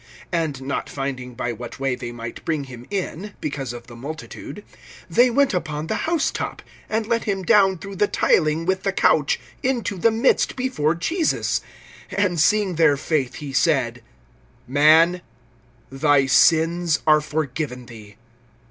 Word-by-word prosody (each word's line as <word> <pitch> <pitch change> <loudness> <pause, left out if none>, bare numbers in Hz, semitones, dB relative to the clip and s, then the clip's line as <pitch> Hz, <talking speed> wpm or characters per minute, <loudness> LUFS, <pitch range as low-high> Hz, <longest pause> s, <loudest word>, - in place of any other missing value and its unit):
(19)And 155 -6 -1
not 140 +1 -3
finding 130 -3 -5
by 120 0 -3
what 120 +3 -9
way 135 -1 0
they 120 -1 -6
might 115 -1 -8
bring 155 -3 -1
him 125 -2 -11
in, 200 0 -4
because 135 -4 -4
of 120 0 -9
the 120 0 -12
multitude, 155 - -8 0.4
they 240 +9 +4
went 275 +1 +2
upon 155 -4 -3
the 165 - -2
housetop, 330 -4 -1 0.3
and 220 0 -1
let 230 +1 0
him 195 -2 -1
down 195 -2 +4
through 195 +4 -8
the 205 +2 +2
tiling 155 -3 +2
with 190 +1 0
the 195 - 0
couch 150 -6 +2 0.2
into 240 -7 -1
the 230 - +4
midst 225 +4 +2
before 250 - 0
Jesus. 320 - 0 0.5
(20)And 185 -4 +1
seeing 200 +2 +2
their 155 -4 +4
faith 140 -3 -1
he 145 -2 -7
said: 130 -6 +1 0.7
Man, 160 +6 +5 0.7
thy 140 0 +3
sins 165 +4 +3
are 155 -1 +5
forgiven 140 -4 -3
thee. 105 -3 -13
155 Hz, 150 wpm, -22 LUFS, 135-195 Hz, 0.7 s, Man